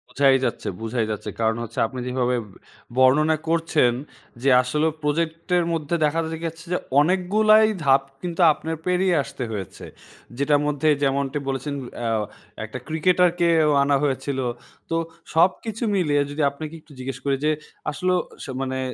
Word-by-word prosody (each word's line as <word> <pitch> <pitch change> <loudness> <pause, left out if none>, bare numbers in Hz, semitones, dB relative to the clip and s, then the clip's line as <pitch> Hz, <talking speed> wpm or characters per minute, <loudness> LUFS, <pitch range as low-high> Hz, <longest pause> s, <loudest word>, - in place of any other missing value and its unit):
বোঝাই 135 -1 +4
যাচ্ছে, 120 - -3
বোঝাই 115 0 -1
যাচ্ছে। 105 - -5
কারণ 110 0 +1
হচ্ছে 115 - -6
আপনি 130 +2 -7
যেভাবে 125 0 0 0.6
বর্ণনা 150 +5 +4
করছেন 160 -6 +2 0.5
যে 135 - +4
আসলে 150 +5 0 0.2
প্রজেক্ট 160 +2 -1
এর 175 - +2
মধ্যে 160 0 -1
দেখা 150 +2 0 0.3
যাচ্ছে 165 +1 -6
যে, - - +2 0.2
অনেকগুলাই 210 +6 +4 0.2
ধাপ 135 0 +5 0.2
কিন্তু 175 0 -3
আপনার 160 +2 -5
পেরিয়ে 180 0 +2
আসতে 135 -1 -6
হয়েছে। 100 -5 -6 0.5
যেটার 145 +1 +2
মধ্যে 150 +1 0 0.2
যেমনটি 140 +1 0
বলেছেন 135 +2 -2 0.3
অ্যা 115 -1 -1 0.5
১ - - -7
টা 130 - -4
ক্রিকেটারকে 175 +2 +2 0.2
ও - - +3
আনা 140 0 +2
হয়েছিল। 140 -1 -1 0.5
তো 165 - 0 0.4
সবকিছু 195 +7 +1
মিলিয়ে 150 -6 +2
যদি 150 +2 -3
আপনাকে 155 +2 -8
একটু 155 - -22
জিজ্ঞেস 130 +1 -5
করি 140 -1 +2
যে 155 - +4 0.4
আসলে 180 +5 0 0.5
মানে 130 0 -2
150 Hz, 150 wpm, -23 LUFS, 135-165 Hz, 0.6 s, ধাপ